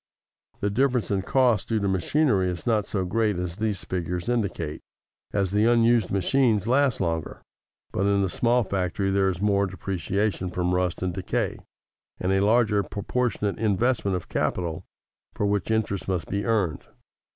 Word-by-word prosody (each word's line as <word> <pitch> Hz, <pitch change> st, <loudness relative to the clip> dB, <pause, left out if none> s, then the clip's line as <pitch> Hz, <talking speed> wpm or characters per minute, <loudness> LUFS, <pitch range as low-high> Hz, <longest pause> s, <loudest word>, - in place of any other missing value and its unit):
The 100 Hz, -, 0 dB
difference 125 Hz, 0 st, +1 dB
in 100 Hz, -1 st, +1 dB
cost 120 Hz, 0 st, +2 dB
due 110 Hz, -1 st, +1 dB
to 100 Hz, -, -1 dB
machinery 95 Hz, -, +2 dB
is 90 Hz, -1 st, -5 dB
not 110 Hz, -4 st, +1 dB
so 95 Hz, -3 st, -1 dB
great 105 Hz, +1 st, 0 dB
as 90 Hz, 0 st, -4 dB
these 110 Hz, -3 st, -1 dB
figures 90 Hz, +2 st, -3 dB
indicate, 100 Hz, -10 st, -2 dB, 0.5 s
as 100 Hz, -3 st, 0 dB
the 105 Hz, +2 st, +3 dB
unused 115 Hz, -2 st, +4 dB
machines 105 Hz, +1 st, +2 dB
last 130 Hz, +1 st, +2 dB
longer; 80 Hz, -3 st, -3 dB, 0.5 s
but 100 Hz, -, 0 dB
in 100 Hz, -1 st, +2 dB
the -, -, +1 dB
small 120 Hz, +6 st, +2 dB
factory 95 Hz, 0 st, -1 dB
there 95 Hz, 0 st, +2 dB
is 90 Hz, -1 st, -4 dB
more 100 Hz, -1 st, +2 dB
depreciation 95 Hz, +2 st, -2 dB
from 90 Hz, 0 st, -1 dB
rust 90 Hz, 0 st, 0 dB
and 90 Hz, -1 st, -1 dB
decay, 95 Hz, +1 st, -2 dB, 0.6 s
and 90 Hz, -, 0 dB
a 95 Hz, -, +3 dB
larger 110 Hz, -1 st, +3 dB
proportionate 105 Hz, 0 st, -2 dB
investment 110 Hz, -2 st, +1 dB
of 90 Hz, -, -9 dB
capital 85 Hz, -3 st, -2 dB, 0.5 s
for 105 Hz, -, 0 dB
which 100 Hz, -2 st, 0 dB
interest 110 Hz, -3 st, -1 dB
must 90 Hz, -4 st, -2 dB
be 100 Hz, +1 st, -1 dB
earned. 100 Hz, -9 st, 0 dB
100 Hz, 165 wpm, -25 LUFS, 90-110 Hz, 0.6 s, unused